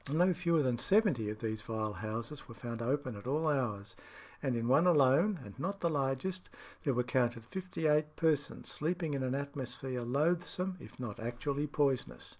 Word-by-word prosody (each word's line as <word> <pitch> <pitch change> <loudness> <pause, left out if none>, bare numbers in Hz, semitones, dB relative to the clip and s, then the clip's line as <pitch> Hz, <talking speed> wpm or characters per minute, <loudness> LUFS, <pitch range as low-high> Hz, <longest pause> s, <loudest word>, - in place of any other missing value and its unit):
No 180 +4 +4
fewer 170 -2 +2
than 125 -3 +1
seventy 185 - +3
of 110 0 -6
these 110 -1 -2
vile 110 -1 -2
houses 115 +7 -5
were 115 - -10
found 115 0 -5
open 130 0 -1
at 100 +4 -9
all 155 +4 +1
hours, 110 -9 -1 0.5
and 130 -3 0
in 115 0 -1
one 140 +8 +5
alone, 165 +5 +5
and 100 - -9
not 195 +6 -2
the 170 - +2
largest, 145 +6 -1 0.3
there 140 -5 +1
were 125 - +2
counted 120 -2 0
fifty 185 +1 -4
eight 150 0 +3
persons 155 -3 0
sleeping 165 0 -1
in 140 - -1
an 130 0 0
atmosphere 135 -2 -3
loathsome 170 +8 +1
if - - -12
not 120 -5 -5
actually 135 +6 -2
poisonous. 135 - 0
135 Hz, 180 wpm, -33 LUFS, 120-160 Hz, 0.5 s, one